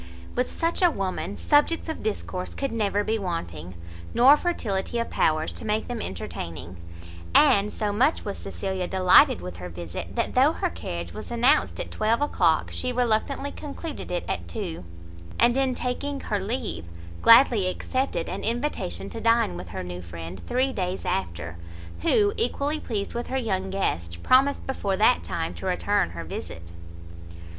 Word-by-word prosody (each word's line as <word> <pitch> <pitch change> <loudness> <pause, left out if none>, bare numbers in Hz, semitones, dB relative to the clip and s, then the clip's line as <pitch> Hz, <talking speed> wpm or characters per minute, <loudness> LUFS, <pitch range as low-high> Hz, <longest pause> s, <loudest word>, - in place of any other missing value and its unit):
With 250 +1 0
such 330 +2 -1
a 355 - +6
woman, 195 - -3
subjects 300 +3 +3
of 320 - -4
discourse 185 -4 -3
could 275 -1 -2
never 205 -2 0
be 220 +1 0
wanting, 90 - -4 0.4
nor 260 +5 +8
fertility 235 - -2
of 235 - -2
powers 155 0 +1
to - - -7
make 215 0 -1
them 240 -2 -4
entertaining: 85 -1 -6 0.6
and 205 +1 +6
so 210 -2 -2
much 260 +9 +2
was 200 - -4
Cecilia 190 -2 -3
delighted 185 - +5
with 90 -1 -7
her 90 0 -7
visit, 85 0 -7
that - - 0
though - - +5
her - - -1
carriage 85 0 -6
was - - -7
announced 240 - +3
at - - -4
twelve 220 +2 +1
o'clock, 175 - +2
she 255 - -2
reluctantly 250 +4 0
concluded 300 +1 -7
it 175 - -2
at - - -3
two; 180 - -5 0.6
and 240 +1 +5
in 265 -1 +1
taking 275 +4 -2
her 205 -5 -2
leave, 195 - -3 0.4
gladly 230 -5 +7
accepted 255 0 -2
an - - -5
invitation 225 - -2
to - - -6
dine 230 - +3
with 85 0 -7
her 95 +1 -5
new 90 0 -6
friend 85 +1 -8
three 260 +2 +1
days 185 -2 -3
after; 85 - -3 0.4
who, 410 -1 +3
equally 305 -8 0
pleased 205 -7 -3
with 240 0 -3
her 265 - -1
young 190 -6 -1
guest, 85 - -2
promised 270 +2 +4
before 200 -7 -1
that 220 +5 +4
time 165 -1 -3
to - - -6
return 185 - +1
her 85 0 -7
visit. 85 +1 -7
205 Hz, 165 wpm, -26 LUFS, -, 0.6 s, nor